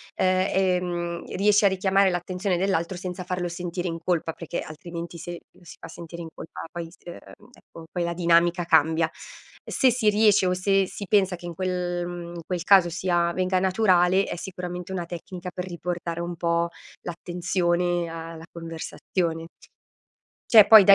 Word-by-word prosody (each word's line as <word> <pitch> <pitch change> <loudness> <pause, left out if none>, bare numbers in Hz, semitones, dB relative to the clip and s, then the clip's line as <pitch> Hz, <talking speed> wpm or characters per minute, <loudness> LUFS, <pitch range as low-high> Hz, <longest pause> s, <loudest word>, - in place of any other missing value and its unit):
ehm, 180 -2 0
riesce 205 +1 +4
a - - +7
richiamare 190 +1 +3
l'attenzione 180 +1 -1
dell'altro 185 -1 0
senza 180 0 -5
farlo 180 0 -2
sentire 175 +1 -4
in 165 - -3
colpa, 165 -2 0
perché, 170 +1 -5
altrimenti 170 +2 -7
se 175 +1 -7
lo - - -22
si 170 - -12
fa - - -9
sentire 170 +1 -9
in 165 - -6
colpa - - -9
poi 170 -1 -5
s - - -19
uhm, 175 +7 -12
ecco 165 -8 -14
poi 175 - -1
la 170 0 -1
dinamica 170 0 +3
cambia. 160 0 +3 0.6
Se 260 -2 +4
si 225 -3 +2
riesce 210 -2 +4
o 180 - +2
se 195 +1 +2
si 200 - -7
pensa 195 -3 +3
che 175 - -12
in 175 - -5
quel, 180 0 -2
mhmm, 175 -1 -7
in 170 - -6
quel 180 -2 -3
caso 190 -2 +6
sia 175 0 +1
venga 185 0 +1
naturale, 185 -1 +3
è - - -4
sicuramente 180 0 -6
una 175 -2 -3
tecnica 175 +1 -7
per 180 0 -5
riportare 170 -1 -4
un 175 0 -4
po' 170 0 +1 0.3
l'attenzione 175 0 -1
a 165 0 -7
la 160 0 -10
conversazione. 165 0 -4 1.0
C'è 220 -3 +10
poi 215 -2 +10
da 200 - +9
175 Hz, 170 wpm, -25 LUFS, 170-185 Hz, 1.0 s, C'è